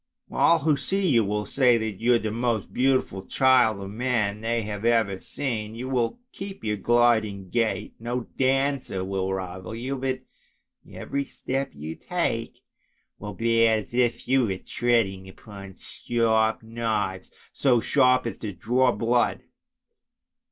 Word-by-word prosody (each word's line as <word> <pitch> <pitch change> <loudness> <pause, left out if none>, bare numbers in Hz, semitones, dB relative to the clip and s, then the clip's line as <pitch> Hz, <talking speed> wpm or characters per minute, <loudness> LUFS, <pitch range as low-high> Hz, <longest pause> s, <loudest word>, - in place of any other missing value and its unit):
All 170 - +4
who 155 -2 +1
see 190 +9 -1
you 115 -5 +4
will 105 +1 -2
say 125 -3 +3
that 110 -3 -4
you 120 +1 +4
are - - +5
the 110 -2 -3
most 115 -2 -1
beautiful 130 -7 +1
child 125 -6 +3
of 100 0 -7
man 110 -3 -1
they 115 0 -1
have 105 0 -5
ever 115 -5 +2
seen. 110 -5 -4
You 125 +3 -5
will 125 - 0
keep 195 0 -8
your 105 -1 -1
gliding 110 -4 +2
gait, 115 -2 -1
no 120 +2 -2
dancer 135 -7 0
will 95 0 -2
rival 95 +2 -5
you, 130 +4 -3
but 130 0 -2 0.7
every 140 0 -3
step 135 +1 -4
you 75 +3 -6
take - - -3 0.6
will 105 -1 -7
be 115 +2 +3
as 110 0 0
if 120 -1 0
you 130 -2 +3
were 95 -2 -2
treading 95 -5 0
upon 100 -1 -11
sharp 110 -2 0
knives, 110 -5 -2 0.2
so 125 -4 +3
sharp 125 +2 +3
as 115 - -4
to 105 - -4
draw 125 +7 +2
blood. 120 +1 +1
115 Hz, 150 wpm, -25 LUFS, 105-125 Hz, 0.7 s, are